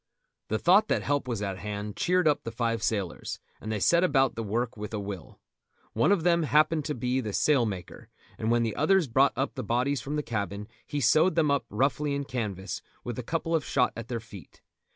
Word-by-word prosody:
The 110 - 0
thought 185 - +5
that - - 0
help 145 -2 0
was 115 -4 -2
at 95 -2 -3
hand 105 +1 -5
cheered 180 -1 +2
up 150 - +2
the - - -4
five 115 -1 -1
sailors, 100 -5 -2 0.2
and 110 - -5
they 110 - -1
set 170 - +4
about 135 -7 +3
the 115 - -4
work 115 +3 -2
with 105 +1 -6
a - - -2
will. 100 -3 -7 0.5
One 160 - +3
of 195 -5 +2
them 170 -1 +3
happened 155 0 +3
to 150 - -2
be 125 +2 0
the 105 -4 -5
sail 135 -3 +3
maker, 95 -4 -7 0.3
and 110 - -1
when 120 0 +3
the 115 -2 -2
others 170 +2 +3
brought 135 +4 +3
up 135 +1 -1
the 130 - -4
bodies 125 +4 0
from 140 +4 -4
the 150 - -1
cabin 105 -3 -3 0.2
he 145 - -2
sewed 155 +7 +4
them 155 -3 +3
up 140 - +1
roughly 140 +5 0
in 140 - -2
canvas, 105 -8 -4 0.2
with 120 0 -5
a - - -4
couple 165 +5 -2
of 160 -3 +2
shot 125 -3 +1
at 115 0 -7
their 120 -2 -3
feet. 105 -4 -14
125 Hz, 225 wpm, -28 LUFS, 110-150 Hz, 0.5 s, thought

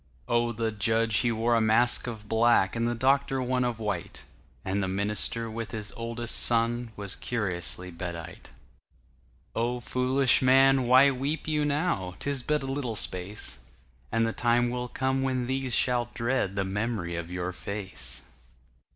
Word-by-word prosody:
Oh, 120 0 +1
the 115 0 -2
judge, 110 +1 +1
he 120 0 +2
wore 115 +1 +1
a 115 - +3
mask 120 +3 +3
of 110 -3 -7
black, 115 -3 +3
And 115 0 0
the 120 - -1
doctor 135 +2 +2
one 125 0 0
of 120 -2 -1
white, 105 -6 -4 0.4
And 95 +2 -1
the 95 - -1
minister, 105 +4 -1
with 115 0 -5
his 105 -2 +2
oldest 115 0 0
son, 120 0 +1
Was 100 -2 -4
curiously 90 -5 -2
bedight. 85 0 -7 1.1
Oh, 120 +2 -1
foolish 130 +1 +2
man, 135 0 +5
why 130 +3 +7
weep 140 +4 -3
you 150 -1 +1
now?'Tis 140 - -1
but 150 +3 0
a - - -4
little 135 -4 -3
space, 95 - -2 0.5
And 115 0 +2
the 115 - -1
time 120 0 +2
will 125 0 -3
come 130 +2 -1
when 130 -2 0
these 130 -1 -1
shall 120 -2 +1
dreadThe 115 -6 -1
mem'ry 100 -4 -2
of 85 0 -5
your 90 0 -3
face. 95 - -4
115 Hz, 155 wpm, -28 LUFS, 105-125 Hz, 1.1 s, why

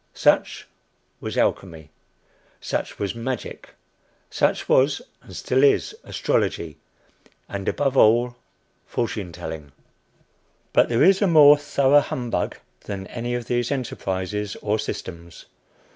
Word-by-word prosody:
Such - - +1 0.5
was - - -5
Alchemy, 80 -5 -1 0.7
such - - -4
was 100 -1 -2
Magic, 120 +1 -6 0.6
such - - 0
was - - +3 0.2
and - - -13
still 130 +2 +1
is 140 - +3
Astrology, 80 -3 -1 0.7
and 100 -1 -3
above 140 -2 -1
all, 120 +1 +4 0.5
Fortune 105 -6 -3
telling. 75 -3 -8 1.0
But - - +4
there 115 0 +3
is 190 +2 +5
a 200 - +4
more 150 -4 +8
thorough 145 -1 +3
humbug 125 -4 -3 0.3
than 100 -2 -5
any 120 +3 -4
of 120 -1 -4
these 120 +1 -1
enterprises 105 -6 -3
or 105 +1 0
systems. 85 -5 -7
115 Hz, 115 wpm, -23 LUFS, 95-130 Hz, 1.0 s, more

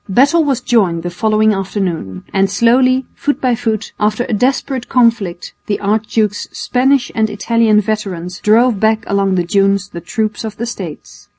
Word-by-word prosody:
Battle 280 - +4
was 275 -4 0
joined 190 -10 +1
the 175 - -4
following 215 +4 +2
afternoon, 185 - -3
and 195 0 +2
slowly, 255 +5 +3
foot 290 - -2
by 255 -2 +1
foot, 225 -2 -2
after 215 +3 +1
a - - -3
desperate 255 +2 -1
conflict 230 -8 +1
the 205 - -1
archduke's 210 0 -1
Spanish 260 0 +1
and 220 -1 +1
Italian 215 +1 +2
veterans 190 -5 -4
drove 225 0 +3
back 220 +1 +2
along 195 -1 0
the 175 - +1
dunes 195 +2 +1
the 170 - -8
troops 215 +2 -3
of 215 -2 -6
the 235 - -3
States. 185 -10 -8
215 Hz, 165 wpm, -15 LUFS, 195-235 Hz, -, Battle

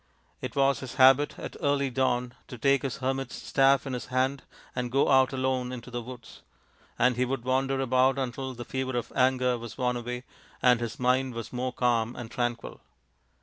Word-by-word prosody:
It - - -5
was 140 0 +3
his 130 -1 -7
habit 135 +2 +5
at - - -7
early 140 -1 +1
dawn 125 -1 0
to 125 - -8
take 140 +3 +3
his 135 -4 -3
hermit's 135 -1 -2
staff 135 -1 +3
in 135 - -4
his 125 - -5
hand 130 +2 0 0.3
and 125 -1 -2
go 135 +2 +3
out 130 -1 +5
alone 130 -1 -1
into 125 -1 -8
the 120 0 -3
woods: 120 -1 -11 0.6
and 125 0 +3
he 125 - +2
would 125 -1 -2
wander 135 +1 +1
about 130 +1 +3
until 130 0 -3
the 120 0 -7
fever 130 -1 -3
of 120 - -4
anger 125 -1 +2
was 115 -1 -9
worn 125 -1 0
away, 125 +1 -5 0.4
and 125 -2 +4
his 120 -2 -5
mind 130 0 +1
was 115 +1 -6
more 125 +1 -2
calm 120 -2 0
and 120 -2 -8
tranquil. 120 -1 -3
130 Hz, 190 wpm, -28 LUFS, 125-135 Hz, 0.6 s, habit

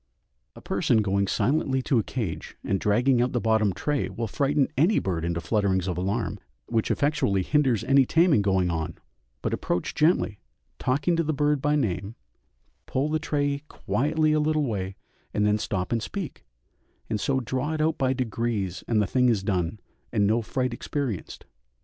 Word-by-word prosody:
A - - -12
person 110 -2 +1
going 100 0 +1
silently 135 - +1
to 130 -4 +2
a - - 0
cage 110 -11 -5
and 95 - 0
dragging 120 +5 +3
out 125 +1 0
the 120 - +1
bottom 110 -2 +2
tray 145 +10 -1
will 115 - -3
frighten 140 +3 +1
any 170 +10 +3
bird 85 -4 -1
into 85 0 -1
flutterings 95 0 0
of 90 - -1
alarm, 100 +3 -2 0.3
which 110 - 0
effectually 140 -10 +1
hinders 135 -4 +2
any 135 0 +5
taming 165 - +4
going 95 -3 +2
on; 80 0 -3 0.5
but - - -1
approach 90 - -2
gently, 150 - +2 0.4
talking 145 +7 +1
to 165 - +2
the 155 -1 -1
bird 145 -1 +1
by 150 +1 +2
name, 105 - -1 0.7
pull 135 +3 0
the 155 +1 0
tray 145 -2 -1
quietly 155 +3 0
a 155 - +3
little 155 0 +1
way, 95 -5 -3 0.4
and 105 - +2
then 105 0 +2
stop 95 -4 -2
and 115 -1 +1
speak, 190 - -6 0.6
and 105 -3 -2
so 135 -1 +1
draw 130 +5 -2
it - - -4
out 160 +1 +1
by 130 -1 +2
degrees 115 -7 -2
and 110 -3 +2
the - - 0
thing 125 +4 +2
is 105 -5 +1
done, 95 0 -1 0.3
and 105 -3 +2
no 110 +3 +2
fright 125 +2 -2
experienced. 120 - -4
120 Hz, 180 wpm, -26 LUFS, 100-145 Hz, 0.7 s, any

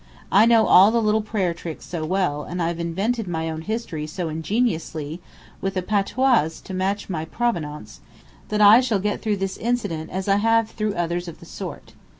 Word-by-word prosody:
I 210 +4 +6
know 230 -2 +5
all 190 +3 +7
the 235 +1 +2
little 215 0 +2
prayer 205 -5 -1
tricks 165 -1 -8
so 170 -3 -4
well, 175 -3 0
and 180 - -6
I've 170 0 -1
invented 195 +7 -1
my 160 -1 -2
own 160 0 -5
history 170 -6 -4
so 165 +1 -4
ingeniously, 160 -3 -2 0.4
with 195 0 -2
a 185 - -1
patois 215 - +2
to 190 - -8
match 195 +2 -1
my 165 -5 -3
province, 155 - -3 0.5
that 210 0 0
I 210 +4 +8
shall 235 -5 +1
get 205 +2 -2
through 215 -2 0
this 195 0 -3
incident 210 -10 -2
as 190 +2 -4
I 200 0 +4
have 225 +1 +2
through 215 -2 -2
others 175 +1 -2
of 170 - -9
the - - -13
sort. - - -8
190 Hz, 190 wpm, -23 LUFS, 165-215 Hz, 0.5 s, I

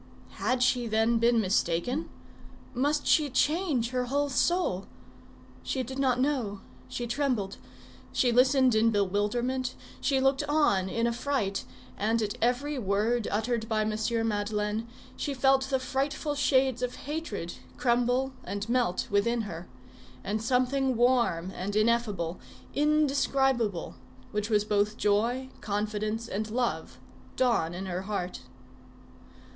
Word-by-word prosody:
Had 255 -1 +1
she, 250 -1 +2
then, 225 +1 +2
been 235 0 +4
mistaken? 200 - 0 0.6
Must 290 +4 0
she 300 -3 +4
change 290 -3 +1
her 250 -1 0
whole 285 +3 0
soul? 265 - +1 0.7
She 260 - -2
did 265 +2 -6
not 255 -2 +2
know; 255 -8 0 0.3
she 185 - -4
trembled. 240 -6 -1 0.5
She 245 - +2
listened 260 +1 +4
in 220 +1 +4
bewilderment, 225 +6 0 0.2
she 270 -2 +1
looked 270 0 +2
on 200 -12 +2
in 230 +4 0
affright, 235 -4 -1 0.3
and 225 +3 +1
at 205 -1 -2
every 260 +5 0
word 215 +2 0
uttered 225 +1 -1
by 220 -1 +1
M. 215 0 0 0.3
Madeleine 210 +1 -1 0.3
she 285 - -3
felt 270 +1 +3
the 265 0 +1
frightful 275 +3 -2
shades 265 -3 +2
of 250 -1 -2
hatred 285 - -4 0.2
crumble 245 +2 +1
and 205 +1 -4
melt 235 -6 +1
within 230 +4 +2
her, 175 -4 -7 0.6
and 210 +2 -2
something 255 +2 +1
warm 235 -8 +2
and 190 +2 -4
ineffable, 215 -6 +1 0.3
indescribable, 275 - +1 0.4
which 210 +1 -2
was 210 -1 +2
both 210 +1 +1
joy, 235 +6 +1
confidence 215 +2 -2
and 215 +1 -3
love, 240 +2 -2 0.4
dawn 230 -10 +1
in 190 +2 -5
her 180 -1 -3
heart. 190 -2 -4
235 Hz, 130 wpm, -28 LUFS, 210-265 Hz, 0.7 s, been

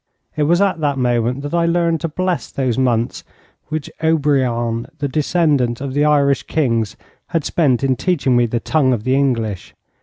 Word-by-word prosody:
It 155 - -2
was 175 +1 +4
at 190 -4 +1
that 145 -3 0
moment 125 +1 0
that 145 - -5
I 170 -1 +2
learned 170 -1 +1
to 165 - -1
bless 180 +2 -2
those 130 -4 -1
months 120 -3 0 0.4
which 155 -1 -4
Obriant, 130 -7 +1
the 145 - -2
descendant 145 -4 +1
of 135 -1 -5
the 145 +2 +2
Irish 140 -2 +3
kings, 115 -8 -1 0.3
had 165 -4 -2
spent 140 -7 +1
in 135 -1 +2
teaching 140 -6 0
me 120 0 +3
the 120 +1 -1
tongue 135 -1 +1
of 110 -3 -3
the 130 - +1
English. 115 -8 -1
140 Hz, 180 wpm, -18 LUFS, 120-155 Hz, 0.4 s, was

